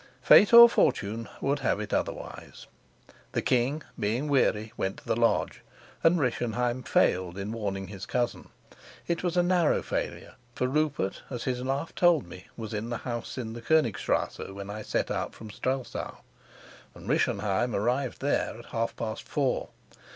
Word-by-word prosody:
Fate 205 - +7
or 235 0 +12
fortune 115 - 0
would 140 +1 0
have 105 - 0
it 105 -1 -5
otherwise. - - -4 0.7
The - - 0
king, 135 +4 +1 0.2
being 115 +7 0
weary, 110 -5 +1
went 95 -3 -2
to - - -15
the - - 0
lodge, 115 0 +1 0.4
and 170 +1 +5
Rischenheim 125 -1 -1
failed 90 -6 +1
in 100 +2 -4
warning 100 -4 -3
his 100 -1 -8
cousin. 120 -1 -2 0.6
It 170 -1 -1
was 180 -1 -1
a 175 - +5
narrow 175 -3 +2
failure, - - -4 0.2
for - - 0
Rupert, 140 -7 0
as 125 -3 -5
his 125 -1 -2
laugh 135 +5 -2
told 175 -5 +3
me, 90 +2 -12
was 110 -2 -6
in 105 +2 -3
the 120 - -2
house 120 0 -5
in 115 -3 -4
the 120 - -8
Konigstrasse 135 -8 0
when 100 +1 -7
I 105 +1 -6
set - - -1
out - - -3
from 110 -1 -10
Strelsau, 130 +4 -3 0.8
and - - -12
Rischenheim 105 +4 +1
arrived 125 +5 -1
there 140 -4 0
at 120 - -12
half 115 0 -1
past 110 -1 -5
four. 140 -4 0
120 Hz, 165 wpm, -28 LUFS, 105-140 Hz, 0.8 s, or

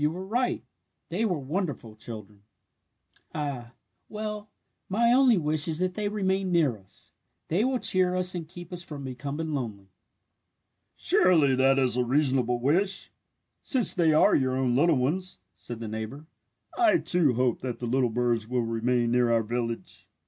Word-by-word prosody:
You 150 - +3
were 180 +4 -6
right. 245 +5 -1 0.5
They 190 +7 -1
were 180 -6 0
wonderful 145 - -4
children! 105 -2 -9 0.9
"Ah, 135 -5 -4 0.4
well, 210 0 -5 0.4
my 235 +5 +3
only 255 -4 +5
wish 155 -1 +2
is 160 -2 -1
that 185 +1 -1
they 210 +1 -2
may 210 - -7
remain 190 -2 0
near 160 -8 +2
us. 95 -3 -13 0.4
They 180 +7 +1
will 260 +1 +1
cheer 185 -5 +1
us 185 0 +1
and 170 -3 -5
keep 175 +1 -10
us 175 - -4
from 150 -5 -8
becoming 140 +5 -5
lonely!" 105 -8 -5 1.0
"Surely 160 -7 +4
that 135 +1 +3
is 130 -2 +1
a 125 - +2
reasonable 130 -2 +1
wish 185 +10 0 0.5
since 250 -8 +3
they 165 -3 +3
are 155 - +4
your 130 -1 +1
own 130 -2 +1
little 160 +2 +3
ones," 175 +9 -1 0.2
said 120 -2 -8
the 115 - -5
neighbour. 110 +7 -6 0.5
"I, 345 -2 +4
too, 170 - +2
hope 125 -1 0
that 125 -2 -4
the 125 - -5
little 125 +1 +1
birds 115 -1 0
will 125 0 0
remain 115 +1 0
near 120 -1 +2
our 115 -1 +2
village!" 115 +1 -5
145 Hz, 170 wpm, -27 LUFS, 120-185 Hz, 1.0 s, only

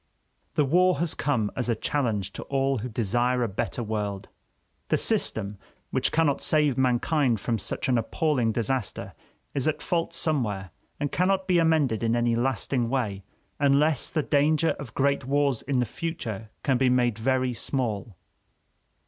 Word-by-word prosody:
The 150 - +3
war 180 +5 +3
has 170 -1 +1
come 115 -8 0
as 125 -2 -2
a 115 - +2
challenge 110 -5 -1
to - - -6
all 135 -1 0
who 125 +4 -4
desire 120 +3 +1
a - - +1
better 105 +4 -3
world. 105 -3 -3 0.6
The - - +2
system 100 -2 -1 0.3
which - - +1
cannot 155 -3 +2
save 150 -4 +2
mankind 130 0 +2
from 115 +2 -1
such - - -3
an 125 -2 +3
appalling 125 0 0
disaster 120 +1 -2 0.4
is 140 +1 0
at 155 - 0
fault 170 -1 -1
somewhere, 110 - -1 0.3
and 145 -1 -2
cannot 190 +1 +1
be 180 -2 +4
amended 155 -9 +2
in 115 0 +1
any 120 -1 +2
lasting 125 0 0
way 110 -7 -1 0.4
unless 140 0 +3
the 155 - 0
danger 150 +3 +2
of 125 -6 -9
great 140 -1 +1
wars 140 -2 +1
in 140 -2 -1
the 125 - +2
future 115 - -5
can 130 -3 +2
be 130 -1 +4
made 120 -3 +2
very 130 +1 +1
small. 115 -4 -2
130 Hz, 160 wpm, -26 LUFS, 115-145 Hz, 0.6 s, be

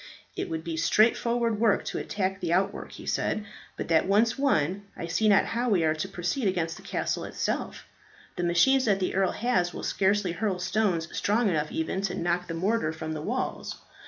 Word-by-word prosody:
"It - - -3
will 160 -1 -3
be 165 0 -4
straightforward 230 +5 +2
work 225 -3 +3
to - - -3
attack 190 -1 -2
the 175 -3 -2
outwork," 195 +3 0
he - - -10
said, 215 - -1 0.3
"but - - -4
that 165 +1 +3
once 220 +4 +3
won, 200 - +1
I - - -4
see 195 +6 +1
not 200 - +5
how 240 +2 -1
we 190 -6 +3
are 155 -1 +3
to 155 +4 -3
proceed 195 +6 -2
against 170 -3 -1
the - - -12
castle - - -2
itself. - - -3 0.5
The - - -3
machines 255 +11 +4
that 200 -3 +2
the 185 - -1
earl 190 -1 +1
has 185 -7 0
will - - -6
scarcely 195 -1 +1
hurl 185 +2 -1
stones 180 -2 0
strong 215 +1 +2
enough 155 -3 -1
even 160 +4 -2
to 195 - -2
knock 175 +1 -1
the 165 - -4
mortar 190 0 0
from 160 0 -5
the 155 - -4
walls. 250 +10 -3
190 Hz, 200 wpm, -27 LUFS, 170-215 Hz, 0.5 s, not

